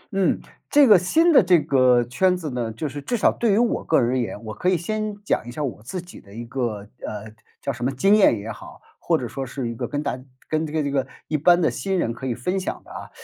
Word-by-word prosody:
嗯， 195 -2 +2 0.3
这 290 -1 +6
个 205 -5 +8
新 325 - +3
的 - - +8
这 180 -3 +4
个 130 -4 +3
圈 180 +10 +1
子 155 -5 -5
呢， 120 -3 -3
就 130 +8 -4
是 145 +1 -6
至 240 - -2
少 - - +4
对 230 -3 0
于 200 - +3
我 235 +1 +1
个 160 - +3
人 120 - +1
而 130 - +1
言， 115 -2 -4
我 110 - -6
可 180 +12 0
以 185 - +3
先 215 +4 -3
讲 - - +1
一 - - -6
下 150 +5 -4
我 125 -6 -4
自 180 - -5
己 180 - -13
的 100 - -18
一 120 +1 -6
个， 115 -4 -3 0.2
呃， 105 0 -6 0.3
叫 140 - -1
什 120 0 -7
么 130 - +1
经 195 +11 +3
验 195 - +5
也 105 +3 -6
好， - - -11 0.2
或 - - +1
者 - - -4
说 135 - -5
是 125 -1 -4
一 - - -4
个 115 - -4
跟 145 0 -3
大 140 - -2
家 130 - -12 0.2
跟 155 0 -1
这 - - -8
个 155 -1 0
这 140 - -2
个 135 -1 0 0.2
一 155 - -2
般 175 +4 +5
的 165 - +2
新 195 -1 -2
人 115 -9 0
可 130 +3 -6
以 120 - -1
分 180 +11 -2
享 185 - -5
的 - - -15
啊。 - - -8
145 Hz, 305 characters per minute, -23 LUFS, 120-185 Hz, 0.3 s, 个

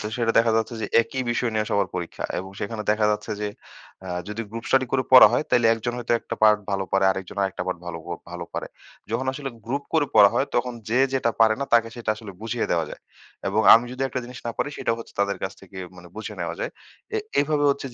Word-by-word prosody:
তো - - -4
সেটা 115 -2 +1
দেখা 115 0 +4
যাচ্ছে 110 +1 -1
যে, 105 - -2 0.2
একই 130 +3 -4
বিষয় 120 0 0
নিয়ে 110 0 0
সবার 100 -2 +1
পরীক্ষা 90 -2 -5
এবং 95 +1 -6
সেখানে 105 +1 -3
দেখা 105 0 +2
যাচ্ছে 105 - -2
যে, 105 - -1 0.6
আ - - -6 0.2
যদি 105 +2 -4
গ্রুপ 115 +1 -6
স্টাডি 130 -1 +3
করে 135 -1 +2
পড়া 130 -4 +11
হয়, 125 - +1
তাইলে 120 -2 +4
একজন 115 +2 -3
হয়তো 120 0 -1
একটা - - -5
পার্ট 105 -1 +7
ভালো 95 -1 0
পারে। 95 0 +3
আরেকজন 95 +1 -5
আরেকটা 95 -1 -2
পার্ট 90 -2 -2
ভালো 85 -1 -5
প - - -10 0.2
ভালো 85 0 -5
পারে। - - -3 0.4
যখন 125 +4 -1
আসলে 135 0 -5 0.2
গ্রুপ 140 +4 -2
করে 155 -3 +3
পড়া 105 -2 +8
হয়, 140 - +2
তখন 125 +1 +1 0.2
যে 125 - +3
যেটা 130 -3 +1
পারে 110 -1 +6
না, - - +1
তাকে 115 -1 +4
সেটা 115 -2 -2
আসলে 105 -2 -9
বুঝিয়ে 115 +1 -2
দেওয়া 85 -2 +1
যায়। - - -9 0.5
এবং 105 +3 +2
আমি 115 +2 +4
যদি 130 +1 -4
একটা 130 - -3
জিনিস 125 0 -9
না - - -1
পারি, 145 - 0
সেটা - - 0
হচ্ছে 115 - -10
তাদের 100 -1 0
কাছ 95 - -2
থেকে 95 0 -12 0.2
মানে 90 -1 -13
বুঝে 110 - -6
নেওয়া - - -3
যায়। - - -2 0.5
এ - - +2 0.2
এভাবে 145 0 +1
হচ্ছে 140 -1 -2
115 Hz, 240 wpm, -24 LUFS, 100-125 Hz, 0.6 s, পড়া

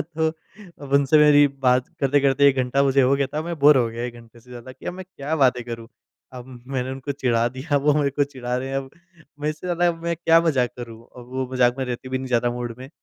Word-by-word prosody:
तो 160 0 -1 0.5
अब 140 -1 -9
उनसे 140 +2 +4
मेरी 145 -1 +6
बात 130 -2 +1
करते-करते 140 0 +3
1 135 - +1
घंटा 130 +2 +1
मुझे 135 0 +3
हो 130 +2 +3
गया 140 0 0
था 150 +3 -4
मैं 170 0 -5
बोर 145 +1 +6
हो 125 -3 +3
गया 115 +1 -6
1 120 -1 -5
घंटे 115 0 -16
से 125 +2 -20
ज़्यादा 125 +1 -10
कि - - -14
अब - - -2
मैं 185 0 -8
क्या 155 -4 -5
बातें 130 -4 +2
करूँ। 115 -1 -8 0.4
अब, 125 -1 -9 0.2
मैंने 130 -1 -3
उनको 135 +2 -5
चिढ़ा 120 -4 0
दिया 130 +4 -3
वो 145 +1 +3
मेरे 145 -2 +1
को 145 +1 +1
चिढ़ा 125 -3 -5
रहे 130 +1 -4
हैं 135 - -3
अब 135 -1 -5 0.5
मैं 150 - -1
इससे 155 +3 -8
ज़्यादा 175 0 +2
मैं। 170 +1 -3
क्या 165 0 +4
मज़ाक 135 -8 +1
करूँ। 115 -2 -9
अब 125 -1 -11
वो 130 0 -2
मज़ाक 125 -1 +3
में 130 - -1
रहते 125 0 -6
भी 130 0 -2
नहीं 130 - -6
ज़्यादा 120 -1 +1
मूड 120 -1 -5
में। 130 +1 -10
135 Hz, 255 wpm, -22 LUFS, 125-145 Hz, 0.5 s, मेरी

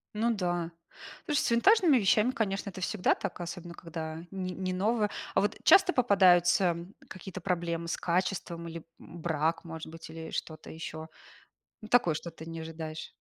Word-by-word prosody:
Ну 230 +2 +2
да. 175 -3 -1 0.5
Слушай, 295 -2 +1
с - - 0
винтажными 330 - +5
вещами, 215 +3 +3
конечно, 200 -4 -2
это 185 0 -9
всегда 200 0 +1
так, - - -5
особенно 175 0 -6
когда 160 -1 -6
не 185 -1 -3
не 185 0 -3
новое. 210 +2 +1 0.3
А 190 - +5
вот 205 - 0
часто 380 -1 +7
попадаются 180 -6 +4 0.3
какие-то 185 0 -8
проблемы 170 -2 -1
с - - -1
качеством 175 -1 -1
или, 165 -1 -7 0.2
м, 170 -1 -11
брак 160 0 0
может 160 -2 -7
быть 165 0 -10
или 160 0 -8
что-то 155 -1 -5
ещё? 160 0 -7 0.7
Ну, 215 - -9
такое, 220 -9 +4
что 170 +2 -5
ты 160 0 -11
не 165 0 -6
ожидаешь. 160 -1 -6
175 Hz, 170 wpm, -30 LUFS, 165-200 Hz, 0.7 s, часто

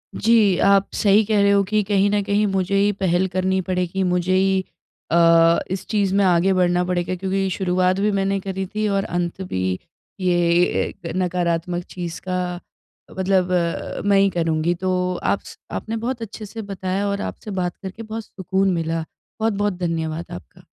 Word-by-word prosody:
जी, 215 -4 +4
आप 200 0 +4
सही 210 0 +4
कह 210 -1 +2
रहे 200 0 +4
हो 200 0 +4
कि 215 0 +2
कहीं 200 0 +2
न 205 0 +2
कहीं 205 +1 +1
मुझे 195 0 0
ही 200 +1 +3
पहल 185 -1 +1
करनी 185 +1 0
पड़ेगी 180 +1 -1
मुझे 180 0 +1
ही 190 0 +2 0.5
अ, 165 0 +5
इस 190 - -3
चीज़ 200 -3 +1
में 200 - +4
आगे 180 +1 +3
बढ़ना 180 -1 +2
पड़ेगा 180 0 -1
क्योंकि 190 +1 -1
शुरुआत 185 0 +1
भी 210 +1 +2
मैंने 195 0 0
करी 190 0 -4
थी 215 0 +1
और 195 -1 +1
अंत 175 +1 -3
भी 95 - -3 0.6
ये 180 -1 +2 0.5
एक 190 - -8
नकारात्मक 175 -1 -1
चीज़ 175 -2 -6
का 185 0 0 0.8
मतलब 185 -1 +2 0.5
मैं 200 -1 +4
ही 195 0 +4
करूँगी। 165 -1 0
तो 185 +2 -2 0.3
आप - - +1
स - - -11
आपने 225 - -4
बहुत 235 +2 -3
अच्छे 220 0 -7
से 225 +2 -7
बताया 195 -1 -3
और 200 0 -2
आपसे 210 - -6
बात 180 -2 -2
करके 195 +4 -8
बहुत 220 +1 -6
सुकून 190 0 -1
मिला। 165 -1 -1 0.4
बहुत-बहुत 205 -2 0
धन्यवाद 165 -1 -2
आपका। 90 - -11
190 Hz, 175 wpm, -21 LUFS, 180-200 Hz, 0.8 s, अ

